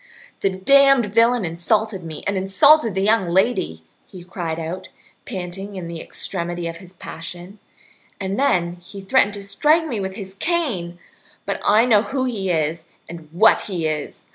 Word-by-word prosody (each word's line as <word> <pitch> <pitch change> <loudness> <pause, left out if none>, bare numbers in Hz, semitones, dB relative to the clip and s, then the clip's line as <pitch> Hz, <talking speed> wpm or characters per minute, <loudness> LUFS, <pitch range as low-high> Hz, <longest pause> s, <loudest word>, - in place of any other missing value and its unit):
"The 195 - +1
damned 275 +6 +4
villain 230 -1 +3
insulted 190 +4 -1
me 160 -2 -8
and 200 - -1
insulted 225 - +4
the 190 - 0
young 215 0 +3
lady," 175 - 0 0.2
he 185 -3 -11
cried 175 -3 -5
out, 175 +3 -6 0.4
panting 190 +2 -6
in 180 -3 -6
the 170 -1 -6
extremity 175 -2 -4
of 165 0 -6
his 180 +1 -14
passion, 175 +3 -9 0.6
"and 195 +2 -3
then 175 -11 +1
he 180 +3 -11
threatened 205 +1 +2
to 200 - -7
strike 305 +11 +2
me 240 -9 -3
with 190 -1 -4
his 190 -1 -8
cane. 200 - -2 0.5
But - - -3
I 215 +3 +5
know 220 -4 +5
who 260 +3 -2
he 205 -7 -2
is 160 -1 -1 0.2
and 165 -2 -10
what 210 +7 +5
he 175 -4 -2
is. 155 -2 -4
190 Hz, 165 wpm, -21 LUFS, 175-225 Hz, 0.6 s, I